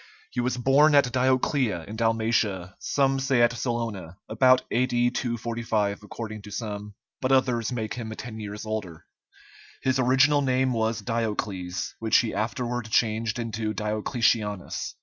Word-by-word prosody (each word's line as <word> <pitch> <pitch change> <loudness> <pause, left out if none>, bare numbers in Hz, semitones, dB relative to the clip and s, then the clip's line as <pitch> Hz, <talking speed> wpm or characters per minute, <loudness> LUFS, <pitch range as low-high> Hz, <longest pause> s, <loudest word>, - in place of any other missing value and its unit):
He 125 - -3
was 125 +1 -1
born 140 +5 +5
at 135 -4 +4
Dioclea, 130 - +1
in 105 - -7
Dalmatia, 110 -5 0
some 135 -1 +1
say 135 -3 +3
at 120 0 +4
Salona, 115 -8 -3
about 130 +3 +4
A.D. 120 0 +2
245 115 -4 -2
according 110 0 -7
to 105 - -11
some, 105 -1 -5 0.3
but 130 0 0
others 125 -3 +2
make 110 -3 -3
him 115 -3 -5
ten 110 -1 -7
years 105 0 -6
older. 105 -7 -5 0.8
His 130 0 +1
original 135 +3 +4
name 130 -1 +1
was 110 -1 0
Diocles, 105 -5 -3
which 110 -1 +3
he 115 - +1
afterward 120 +2 -2
changed 110 0 +1
into 110 -2 -3
Diocletianus. 105 -2 -1
115 Hz, 140 wpm, -26 LUFS, 105-125 Hz, 0.8 s, born